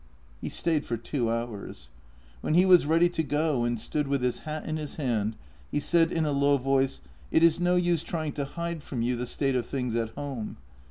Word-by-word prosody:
He -, -, -3 dB
stayed 160 Hz, -3 st, 0 dB
for 120 Hz, -, -3 dB
two 120 Hz, +1 st, -2 dB
hours. 110 Hz, -, -5 dB, 0.5 s
When 155 Hz, -, 0 dB
he 180 Hz, +2 st, +6 dB
was 180 Hz, -5 st, +6 dB
ready 165 Hz, +2 st, +5 dB
to 175 Hz, -, -1 dB
go 150 Hz, -3 st, 0 dB
and 120 Hz, -1 st, -1 dB
stood 145 Hz, +6 st, -2 dB
with 140 Hz, -2 st, 0 dB
his 125 Hz, -1 st, 0 dB
hat 155 Hz, 0 st, -5 dB
in 155 Hz, 0 st, -2 dB
his 150 Hz, -2 st, -5 dB
hand, 115 Hz, -7 st, -1 dB, 0.3 s
he 145 Hz, -, 0 dB
said 165 Hz, +2 st, +3 dB
in 165 Hz, -2 st, +1 dB
a 150 Hz, -, 0 dB
low 140 Hz, 0 st, +3 dB
voice: 135 Hz, -, +1 dB
" -, -, -31 dB
It 160 Hz, -, +4 dB
is 165 Hz, 0 st, +5 dB
no 175 Hz, 0 st, +3 dB
use 175 Hz, -3 st, +2 dB
trying 160 Hz, -2 st, -3 dB
to 140 Hz, -1 st, -3 dB
hide 170 Hz, +2 st, -4 dB
from 125 Hz, -5 st, -3 dB
you 125 Hz, +1 st, +1 dB
the 125 Hz, +1 st, -3 dB
state 135 Hz, 0 st, 0 dB
of 120 Hz, -2 st, -1 dB
tilings 125 Hz, -4 st, -2 dB
at 115 Hz, -1 st, 0 dB
home. 135 Hz, -7 st, -5 dB
145 Hz, 225 wpm, -28 LUFS, 120-160 Hz, 0.5 s, he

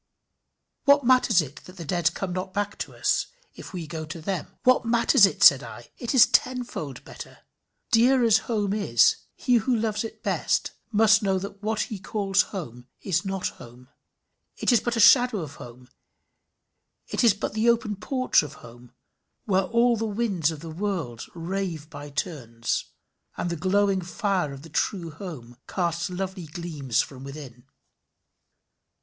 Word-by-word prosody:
What 285 Hz, -1 st, +5 dB
matters 235 Hz, -8 st, +4 dB
it 145 Hz, +1 st, -11 dB
that 185 Hz, +1 st, -13 dB
the 170 Hz, -, -7 dB
dead 170 Hz, 0 st, 0 dB
come 190 Hz, -2 st, -3 dB
not 185 Hz, +1 st, -5 dB
back 205 Hz, 0 st, -1 dB
to -, -, -6 dB
us, -, -, +1 dB, 0.3 s
if -, -, -11 dB
we 180 Hz, -4 st, -5 dB
go 160 Hz, 0 st, -6 dB
to 160 Hz, +2 st, -7 dB
them? 175 Hz, +1 st, -5 dB
What 255 Hz, 0 st, +4 dB
matters 235 Hz, -1 st, +5 dB
it? 200 Hz, 0 st, -2 dB
said 135 Hz, -6 st, +8 dB
I! 120 Hz, -2 st, -11 dB
It 240 Hz, +2 st, -2 dB
is 245 Hz, -, +9 dB
tenfold 240 Hz, -, -1 dB
better. -, -, -10 dB, 0.5 s
Dear 250 Hz, +2 st, +4 dB
as 220 Hz, -2 st, +5 dB
home 205 Hz, -4 st, 0 dB
is, 210 Hz, -1 st, +3 dB, 0.2 s
he 250 Hz, -3 st, +2 dB
who 240 Hz, +3 st, +1 dB
loves 215 Hz, -1 st, -1 dB
it 225 Hz, -, -9 dB
best -, -, 0 dB, 0.2 s
must 220 Hz, 0 st, +5 dB
know 195 Hz, -2 st, +1 dB
that 200 Hz, +1 st, -7 dB
what 215 Hz, 0 st, -1 dB
he 215 Hz, -, -4 dB
calls 195 Hz, 0 st, +1 dB
home 125 Hz, -, -7 dB
is 185 Hz, 0 st, -1 dB
not 195 Hz, -1 st, -2 dB
home, 125 Hz, +2 st, -14 dB, 0.7 s
is 240 Hz, -3 st, +3 dB
but 240 Hz, 0 st, -2 dB
a -, -, -1 dB
shadow 245 Hz, -2 st, +6 dB
of 150 Hz, -3 st, -8 dB
home, 125 Hz, +1 st, -12 dB, 1.2 s
is 230 Hz, -5 st, +3 dB
but 205 Hz, -, -4 dB
the 220 Hz, +2 st, +2 dB
open 225 Hz, -3 st, +1 dB
porch 255 Hz, +6 st, +1 dB
of 150 Hz, -3 st, -8 dB
home, 120 Hz, +1 st, -15 dB, 0.5 s
where 190 Hz, -2 st, +2 dB
all 235 Hz, +3 st, +3 dB
the 225 Hz, 0 st, -2 dB
winds 200 Hz, -7 st, 0 dB
of 155 Hz, -3 st, -6 dB
the 165 Hz, -1 st, -8 dB
world 165 Hz, -, -4 dB
rave 170 Hz, -2 st, -4 dB
by 145 Hz, 0 st, -8 dB
turns, 125 Hz, -7 st, -3 dB, 0.5 s
and 175 Hz, -, -2 dB
the -, -, -1 dB
glowing 195 Hz, +3 st, +1 dB
fire 185 Hz, -3 st, -1 dB
of 140 Hz, 0 st, -10 dB
the 165 Hz, -, -12 dB
true 165 Hz, +2 st, -2 dB
home 150 Hz, -9 st, -9 dB
casts 175 Hz, 0 st, -1 dB
lovely 185 Hz, -1 st, -5 dB
gleams 150 Hz, -6 st, -2 dB
from 135 Hz, -2 st, -11 dB
within. 135 Hz, -4 st, -10 dB
190 Hz, 165 wpm, -25 LUFS, 155-220 Hz, 1.2 s, is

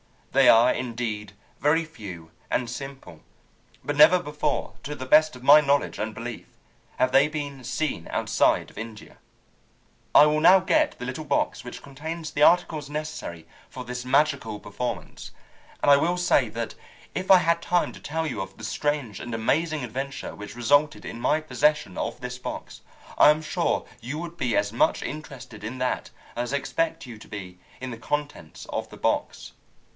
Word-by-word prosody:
They -, -, +5 dB
are 115 Hz, +2 st, +6 dB
indeed 115 Hz, -4 st, -4 dB, 0.3 s
very 150 Hz, +4 st, +3 dB
few 95 Hz, -, -10 dB, 0.2 s
and 125 Hz, -, 0 dB
simple, 130 Hz, -, -8 dB, 0.6 s
but 145 Hz, 0 st, -3 dB
never 175 Hz, +4 st, +8 dB
before, 150 Hz, -2 st, -2 dB
to 150 Hz, +1 st, -5 dB
the 130 Hz, -, -6 dB
best 155 Hz, +2 st, +5 dB
of 125 Hz, -, -12 dB
my 145 Hz, +3 st, +9 dB
knowledge 140 Hz, -1 st, +1 dB
and 110 Hz, 0 st, -3 dB
belief, 115 Hz, 0 st, -7 dB, 0.5 s
have 130 Hz, -, +2 dB
they 135 Hz, +3 st, +5 dB
been 145 Hz, -3 st, -5 dB
seen 135 Hz, -, -2 dB
outside -, -, +1 dB
of -, -, -10 dB
India. 110 Hz, -1 st, -9 dB, 1.0 s
"I 150 Hz, -, +10 dB
will 150 Hz, 0 st, +2 dB
now 185 Hz, +4 st, +7 dB
get -, -, +1 dB
the -, -, -6 dB
little -, -, -5 dB
box -, -, 0 dB
which -, -, -9 dB
contains 155 Hz, +3 st, -6 dB
the 145 Hz, -, -3 dB
articles 155 Hz, -4 st, +3 dB
necessary 150 Hz, -, -5 dB, 0.2 s
for 125 Hz, -, -7 dB
this 125 Hz, 0 st, -6 dB
magical 130 Hz, -6 st, +1 dB
performance, 105 Hz, +5 st, -6 dB, 0.5 s
and 145 Hz, -, +6 dB
I 140 Hz, -, +8 dB
will 175 Hz, +5 st, +1 dB
say 175 Hz, -8 st, +3 dB
that 115 Hz, +1 st, -4 dB, 0.4 s
if 185 Hz, 0 st, -4 dB
I 190 Hz, -, +10 dB
had 170 Hz, 0 st, +1 dB
time 175 Hz, 0 st, +1 dB
to -, -, -12 dB
tell 160 Hz, +2 st, -3 dB
you 140 Hz, -10 st, -3 dB
of 95 Hz, 0 st, -8 dB
the -, -, -12 dB
strange 140 Hz, -3 st, -2 dB
and 120 Hz, -1 st, -5 dB
amazing 155 Hz, +6 st, 0 dB
adventure 135 Hz, +3 st, -5 dB
which 105 Hz, +2 st, -9 dB
resulted 145 Hz, +5 st, +2 dB
in 115 Hz, -, -6 dB
my 155 Hz, +6 st, +1 dB
possession 150 Hz, -9 st, +1 dB
of -, -, -4 dB
this 125 Hz, 0 st, -6 dB
box, -, -, -7 dB, 0.4 s
I -, -, +9 dB
am 150 Hz, +1 st, +3 dB
sure 155 Hz, -, 0 dB
you 125 Hz, +6 st, -5 dB
would 170 Hz, 0 st, -7 dB
be 125 Hz, -8 st, 0 dB
as 100 Hz, +1 st, 0 dB
much 120 Hz, -, +2 dB
interested 130 Hz, -7 st, -8 dB
in 115 Hz, +4 st, -5 dB
that 125 Hz, 0 st, -1 dB, 0.3 s
as 120 Hz, +2 st, -2 dB
I -, -, +3 dB
expect 165 Hz, +3 st, -2 dB
you 115 Hz, -4 st, -10 dB
to -, -, -13 dB
be 90 Hz, -4 st, -8 dB, 0.2 s
in 130 Hz, -1 st, -5 dB
the 115 Hz, -, -6 dB
contents 145 Hz, -, -4 dB
of -, -, -4 dB
the -, -, -12 dB
box. -, -, -1 dB
135 Hz, 180 wpm, -25 LUFS, 115-150 Hz, 1.0 s, I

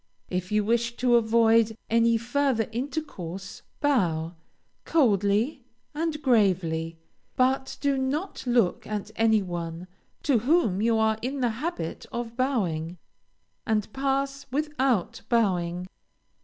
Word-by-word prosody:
If 180 Hz, +1 st, -2 dB
you 210 Hz, 0 st, +2 dB
wish 235 Hz, +2 st, 0 dB
to 245 Hz, -1 st, +3 dB
avoid 225 Hz, -1 st, +4 dB
any 230 Hz, 0 st, +3 dB
further 245 Hz, 0 st, 0 dB
intercourse 225 Hz, -, -5 dB, 0.2 s
bow, 175 Hz, -, +1 dB, 0.5 s
coldly 230 Hz, -, +2 dB, 0.3 s
and 315 Hz, 0 st, -2 dB
gravely, 175 Hz, -, +2 dB, 0.4 s
but 265 Hz, +1 st, +1 dB
do 280 Hz, -2 st, +1 dB
not 290 Hz, +8 st, -2 dB
look 240 Hz, -7 st, +2 dB
at 210 Hz, 0 st, -4 dB
any 220 Hz, -2 st, +3 dB
one, 170 Hz, -1 st, -5 dB, 0.4 s
to 270 Hz, -6 st, +3 dB
whom 230 Hz, -, +2 dB
you 225 Hz, 0 st, +3 dB
are 220 Hz, 0 st, +2 dB
in 265 Hz, +3 st, -3 dB
the 245 Hz, -, +2 dB
habit 230 Hz, -, -4 dB
of 235 Hz, -1 st, -5 dB
bowing, 180 Hz, -, -1 dB, 0.7 s
and 215 Hz, -1 st, -1 dB
pass 275 Hz, 0 st, -1 dB
without 270 Hz, -, 0 dB
bowing. 180 Hz, -7 st, +1 dB
230 Hz, 115 wpm, -26 LUFS, 195-265 Hz, 0.7 s, avoid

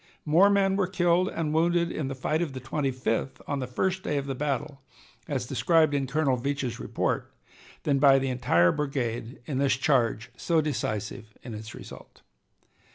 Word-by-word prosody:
More 170 Hz, +6 st, +5 dB
men 195 Hz, -1 st, +3 dB
were 190 Hz, -2 st, +1 dB
killed 175 Hz, +1 st, +2 dB
and 155 Hz, -5 st, -2 dB
wounded 170 Hz, +1 st, +2 dB
in 150 Hz, -, -3 dB
the 135 Hz, -, -4 dB
fight 155 Hz, +5 st, -1 dB
of 160 Hz, -6 st, -2 dB
the 130 Hz, -, -5 dB
Twenty 135 Hz, +2 st, -2 dB
fifth 130 Hz, 0 st, -2 dB
on 145 Hz, -, -1 dB
the 130 Hz, -, -3 dB
first 185 Hz, +9 st, -1 dB
day 150 Hz, -, -1 dB
of 140 Hz, -, -2 dB
the 135 Hz, -, -3 dB
battle, 135 Hz, 0 st, -3 dB, 0.5 s
as 140 Hz, -5 st, -2 dB
described 155 Hz, +4 st, +3 dB
in 140 Hz, -2 st, 0 dB
Colonel 135 Hz, -1 st, +1 dB
Veatch's 135 Hz, -2 st, -2 dB
report, -, -, -2 dB, 0.5 s
than 140 Hz, -2 st, +2 dB
by 135 Hz, -1 st, +7 dB
the 135 Hz, 0 st, 0 dB
entire 85 Hz, -9 st, +3 dB
brigade 125 Hz, -, -3 dB
in 135 Hz, -3 st, -2 dB
this 135 Hz, -2 st, +2 dB
charge 125 Hz, -4 st, +1 dB
so 165 Hz, +5 st, +1 dB
decisive 110 Hz, -7 st, -3 dB
in 120 Hz, -, -7 dB
its 110 Hz, +1 st, -8 dB
result. -, -, -12 dB
140 Hz, 180 wpm, -27 LUFS, 125-155 Hz, 0.5 s, by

